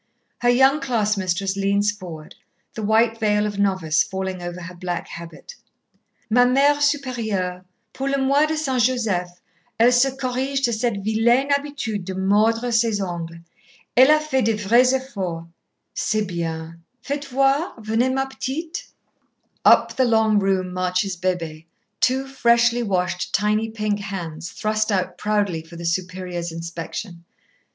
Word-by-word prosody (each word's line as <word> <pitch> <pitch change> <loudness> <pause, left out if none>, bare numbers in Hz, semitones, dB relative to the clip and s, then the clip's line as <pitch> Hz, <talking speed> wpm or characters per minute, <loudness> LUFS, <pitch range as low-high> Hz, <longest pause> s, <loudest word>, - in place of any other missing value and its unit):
Her 245 - +2
young 265 +4 +4
class 225 -6 +1
mistress 190 0 -1
leans 200 +1 +1
forward, 175 -7 -10 0.4
the 220 - -6
white 225 +2 +2
veil 210 -1 +2
of 205 -1 -4
novice 185 -6 +2
falling 190 -1 -3
over 175 +1 -6
her 170 +1 -8
black 175 -1 -4
habit. 170 - -10 0.7
"Ma 245 +3 +4
Mère 275 +4 +4
Supérieure, 235 -11 -1 0.3
pour 270 +1 -3
le 275 - +1
mois 275 +3 +3
de 315 - -1
S. 310 0 -2 0.2
Joseph, 215 -8 0 0.5
elle 235 +2 +6
se 245 +2 +4
corrige 265 +1 -2
de 235 - 0
cette 220 -3 -1
vilaine 235 +6 +2
habitude 280 -8 -2
de 190 0 -5
mordre 215 +5 +2
ses 225 -2 +2
ongles. 170 -3 -5 0.5
Elle 260 +3 +7
a 305 0 +6
fait 305 -4 0
de 225 0 +2
vrais 235 +5 +4
efforts...." 190 -11 -4 0.5
"C'est 215 -1 0
bien. 165 -2 -5 0.2
Faites 285 0 -4
voir.... 275 +5 +1
Venez, 225 +3 0
ma 270 +1 0
petite." 310 +5 -5 0.8
Up - - +5
the 260 - +4
long 220 -2 +3
room 190 -2 0
marches 185 +1 -1
Bébée, 170 -3 -3 0.3
two 260 +1 +2
freshly 240 -2 +3
washed 180 -4 -1
tiny 210 +2 +1
pink 215 -2 -2
hands 175 -5 -6
thrust 215 +2 -1
out 185 -2 -1
proudly 205 -6 0
for 165 +1 -14
the 170 0 -7
Superior's 180 0 -3
inspection. 170 +2 -7
210 Hz, 145 wpm, -22 LUFS, 180-250 Hz, 0.8 s, Elle